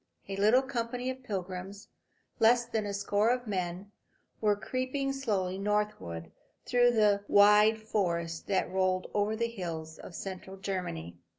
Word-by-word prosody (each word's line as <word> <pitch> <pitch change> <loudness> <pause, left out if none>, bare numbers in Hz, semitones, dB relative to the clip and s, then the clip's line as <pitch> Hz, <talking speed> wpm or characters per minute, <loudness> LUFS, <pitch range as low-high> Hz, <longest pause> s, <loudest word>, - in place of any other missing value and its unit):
A 195 - -4
little 215 +7 +4
company 250 -1 -2
of 260 0 -9
pilgrims, 195 -2 -5 0.5
less 235 +1 +5
than 220 -3 -2
a - - -2
score 205 +2 +1
a 245 -1 0
men, 185 0 -3 0.5
were 210 -2 +3
creeping 255 +5 -2
slowly 195 -9 -1
northward 195 - -2 0.3
through 245 -1 +4
the 205 -3 +3
wide 210 +2 +6
forest 170 -6 -2
that 190 -2 0
rolled 185 0 0
over 210 +1 +1
the 235 +1 0
hills 165 -7 -6
of 170 - -10
central 190 +1 -7
Germany. 90 - -4
205 Hz, 140 wpm, -30 LUFS, 185-230 Hz, 0.5 s, wide